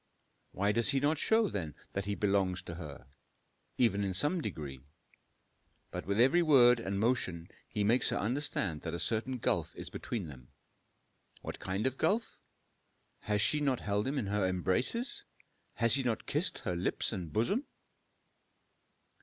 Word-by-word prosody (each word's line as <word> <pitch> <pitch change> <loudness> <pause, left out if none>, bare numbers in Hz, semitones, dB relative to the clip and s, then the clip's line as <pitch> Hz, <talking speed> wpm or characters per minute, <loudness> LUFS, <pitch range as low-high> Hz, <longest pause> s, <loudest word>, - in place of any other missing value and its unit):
Why 100 +2 +1
does 115 +3 +3
he 140 -1 +3
not 145 +2 +1
show, 220 +3 +3
then, 80 - -4 0.2
that 100 0 -2
he 100 0 -1
belonged 95 -3 0
to 85 - -6
her, 75 -7 -8 0.7
even 100 -5 +2
in 95 -2 -2
some 150 - +1
degree? 70 - -5 1.1
But - - -6
with 100 +2 0
every 135 +9 +5
word 125 -7 +6
and 100 -3 -2
motion 95 -7 0 0.2
he 105 - -1
makes 115 +5 +3
her - - 0
understand 105 - -1
that 85 0 -4
a - - -4
certain 115 +8 0
gulf - - -1
is - - -7
between 110 -7 -4
them. 65 -5 -11 1.0
What - - -6
kind 95 +3 -2
of 130 0 -1
gulf? 210 +8 0 0.8
Has 105 -1 0
she 150 +8 +3
not 135 -4 0
held 105 +2 -1
him 140 +2 -1
in 125 - -1
her 100 -1 +1
embraces? 95 - 0 0.5
Has 115 -1 +4
he 140 - +5
not 120 -4 -1
kissed - - 0
her 90 - -3
lips 90 +5 -1
and 90 -6 -5
bosom? 195 - 0
105 Hz, 160 wpm, -32 LUFS, 95-130 Hz, 1.1 s, word